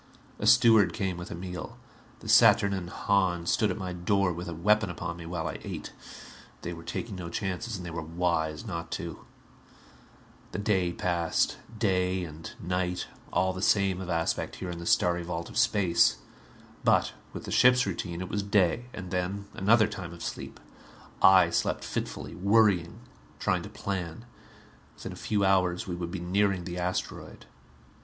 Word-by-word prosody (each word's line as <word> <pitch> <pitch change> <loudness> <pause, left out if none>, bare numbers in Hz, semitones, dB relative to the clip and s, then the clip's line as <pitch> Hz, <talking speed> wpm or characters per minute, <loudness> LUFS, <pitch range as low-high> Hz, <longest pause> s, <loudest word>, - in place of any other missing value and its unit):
A - - -1
steward 110 -7 +6
came 95 -4 -2
with 85 0 -7
a - - -5
meal. 90 -2 -7 0.4
The - - -10
saturnine 100 -3 +5
Hahn 90 -2 +1
stood 105 +4 +2
at - - -2
my 95 -3 -4
door 90 +1 +1
with 85 +1 -6
a - - -4
weapon 105 +4 +3
upon 85 -1 -4
me 85 -1 -8
while 85 -1 -3
I 75 - -5
ate. - - -6 0.7
They 85 - -4
were 85 - -9
taking 105 +5 -5
no 85 -2 -6
chances 95 +5 -3
and 90 - -8
they 85 - -5
were 85 0 -4
wise 80 +2 -1
not 85 -5 -5
to. 85 -2 -5 1.3
The - - -2
day 100 -4 +1
passed. 85 -2 0 0.2
Day 95 -3 +1
and 80 -1 -8
night, 90 0 -2 0.3
all 95 0 +1
the 95 - -6
same 95 -2 +2
of 90 - -6
aspect 85 -1 -1
here 90 -2 -5
in 85 - -6
the 85 - -6
starry 90 0 +3
vault 85 -1 -4
of - - -6
space. 95 -5 +3 0.7
But - - +3 0.2
with - - -7
the - - -6
ship's 125 0 +5
routine 85 -2 -4
it 90 - -4
was 105 - -1
day. 100 +2 +2
And 95 -3 -7
then 95 +2 -2
another 110 +3 +4
time 100 -5 -6
of 85 - -9
sleep. - - -6 0.6
I 95 -1 +7
slept - - 0
fitfully, - - -4
worrying, 100 -3 +2 0.4
trying - - 0
to - - -8
plan. 95 +2 -4 0.7
Within - - -7
a - - -8
few 100 -2 0
hours 90 -2 +2
we 90 - -4
would 85 -1 -4
be 95 - -4
nearing 95 +1 +1
the 90 0 -5
asteroid. 90 +1 -4
90 Hz, 175 wpm, -28 LUFS, 85-100 Hz, 1.3 s, I